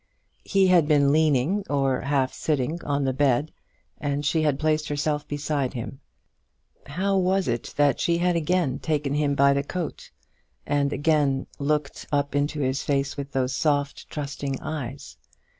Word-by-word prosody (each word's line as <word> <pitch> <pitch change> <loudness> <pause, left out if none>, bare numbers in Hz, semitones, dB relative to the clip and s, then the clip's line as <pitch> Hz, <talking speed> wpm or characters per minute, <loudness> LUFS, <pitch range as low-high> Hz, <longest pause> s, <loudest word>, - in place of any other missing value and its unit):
He 195 -2 +3
had 180 -5 +4
been 145 -2 +4
leaning, 155 +5 +2
or 135 -2 +1
half 135 -1 0
sitting, 155 +2 -1
on 145 0 0
the 130 - +1
bed, 140 +2 +1 0.5
and 145 0 -2
she 160 +3 +2
had 150 -3 +1
placed 155 0 0
herself 150 0 -1
beside 145 -2 -2
him. 125 +3 -6 0.9
How 190 +8 0
was 190 +1 +1
it 120 -1 -3
that 145 -1 +3
she 170 0 +2
had 175 0 +1
again 170 -4 0
taken 150 -3 -1
him 145 -1 +1
by 140 0 +5
the 140 - +1
coat, 170 +3 -5 0.6
and 145 -1 +1
again 145 -2 +1
looked 145 0 -1
up 145 -1 0
into 145 +1 0
his 130 0 0
face 140 -1 -1
with 140 0 -6
those 130 -1 0
soft, 145 -2 0
trusting 140 -2 -4
eyes? 140 -3 -6
145 Hz, 160 wpm, -25 LUFS, 140-155 Hz, 0.9 s, by